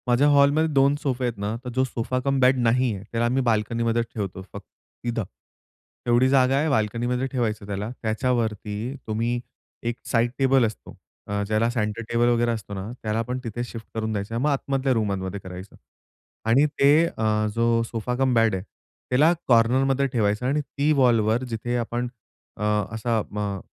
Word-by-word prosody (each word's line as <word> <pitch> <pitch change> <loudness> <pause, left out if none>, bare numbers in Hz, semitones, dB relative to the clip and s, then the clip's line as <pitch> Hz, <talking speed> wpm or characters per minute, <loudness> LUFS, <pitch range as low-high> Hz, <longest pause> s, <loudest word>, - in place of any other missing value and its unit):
माझ्या 125 +4 +4
हॉलमध्ये 145 +2 +4
2 140 +1 +4
सोफे 130 -3 -1
आहेत 120 -3 -2
ना, 105 +2 -2
तर 125 - -5
जो 130 - +3
सोफा 130 0 -2
कम 135 -1 +1
बेड 130 +1 +4
नाहीये, 120 -3 +1
त्याला 115 0 0
आम्ही 125 +3 +1
बाल्कनीमध्ये 115 0 +1
ठेवतो 95 -4 -4
फक्त 100 - -8 0.4
तिथं. 120 -2 -1 0.8
एवढी 120 +2 +4
जागा 135 -1 +4
आहे 155 +3 +1
बाल्कनीमध्ये 120 +1 0
ठेवायचं 110 -5 -2
त्याला, 100 +1 -3
त्याच्यावरती 110 -1 -1
तुम्ही 115 +3 -1 0.5
एक 120 - -3 0.2
साइड 120 0 +2
टेबल 135 -2 +4
असतो, 110 -1 -7 0.3
अ, 100 0 -1
ज्याला 110 +2 +2
सेंटर 115 -2 -2
टेबल 120 +1 +3
वगैरे 120 0 +2
असतो 110 -3 -5
ना 100 +3 -5
त्याला 110 0 -1
आपण 125 +3 -2
तिथे 120 +1 -4
शिफ्ट 115 -2 -8
करून 110 0 -2
द्यायचं, 105 +2 -3
मग 140 +5 +1
आतमधल्या 135 -1 0
रूममध्ये 100 -3 -2
करायचं. 95 +1 -10 0.7
आणि 125 +6 +4
ते 145 +4 +6
अ, 110 -7 0
जो 115 0 +2
सोफा 115 +1 -3
कम 130 0 +1
बेड 115 -3 +3
आहे, 95 - -4 0.5
त्याला 150 +7 +4
कॉर्नरमध्ये 130 +3 +3
ठेवायचं 110 -2 0
आणि 145 +4 +1
ती 145 +1 -1
वॉलवर 115 -1 +3
जिथे 120 +1 -3
आपण 120 +1 -2 0.5
अ, 105 - -5 0.3
असा 115 +1 0
अ, 105 -2 -4
115 Hz, 165 wpm, -24 LUFS, 110-130 Hz, 0.8 s, ते